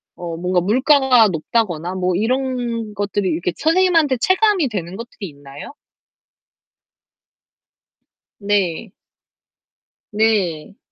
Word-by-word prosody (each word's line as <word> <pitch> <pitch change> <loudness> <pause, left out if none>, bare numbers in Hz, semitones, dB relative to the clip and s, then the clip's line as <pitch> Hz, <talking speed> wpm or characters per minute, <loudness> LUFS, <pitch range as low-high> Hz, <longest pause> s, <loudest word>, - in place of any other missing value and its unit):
어, 170 -2 -6
뭔가 180 0 0
물가가 255 - +4
높다거나 180 0 -2
뭐 180 -1 -1
이런 240 -1 -2
것들이 200 -1 -2
이렇게 170 +2 -2
선생님한테 330 -4 +2
체감이 375 - +2
되는 185 -4 -5
것들이 225 -3 -8
있나요? 145 - -12 2.7
네. 200 -1 -1 1.2
네. 205 -5 -1
205 Hz, 205 characters per minute, -19 LUFS, 180-255 Hz, 2.7 s, 물가가